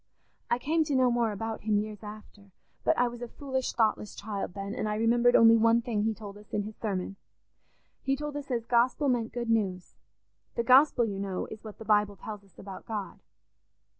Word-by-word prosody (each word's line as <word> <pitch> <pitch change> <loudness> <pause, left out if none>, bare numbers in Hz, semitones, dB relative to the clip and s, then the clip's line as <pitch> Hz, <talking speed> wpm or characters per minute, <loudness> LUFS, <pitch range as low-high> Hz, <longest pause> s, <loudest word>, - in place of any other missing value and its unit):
I 240 - +2
came 315 +6 +1
to 290 -2 -1
know 255 -1 +4
more 235 -2 +1
about 225 +2 -4
him 210 -1 +1
years 210 0 -3
after, 210 -1 -11 0.3
but - - +2
I 245 - +3
was 240 0 -7
a 240 - -4
foolish 260 +1 -3
thoughtless 215 -2 0
child 200 -3 -5
then, 200 0 -4
and 215 -3 -2
I 210 - -1
remembered 235 +2 +3
only 230 0 +8
one 230 +1 +4
thing 225 -4 -1
he 220 -1 0
told 205 -2 -9
us 210 - -18
in 205 - 0
his 215 +1 -8
sermon. 195 -2 -3 0.8
He 270 - +1
told 295 +1 -5
us 285 -1 -6
as 235 -3 -1
'Gospel' 250 +4 +2
meant 235 -3 0
'good 235 -1 -2
news.' 190 -5 -1 0.6
The 235 - 0
Gospel, 255 0 +5
you 200 -3 -4
know, 195 -2 -3
is 220 - -9
what 215 -2 -9
the 225 - -10
Bible 210 -1 +3
tells 210 +1 -8
us 195 -3 -25
about 195 -1 -10
God. 210 -3 -5
225 Hz, 210 wpm, -29 LUFS, 210-240 Hz, 0.8 s, only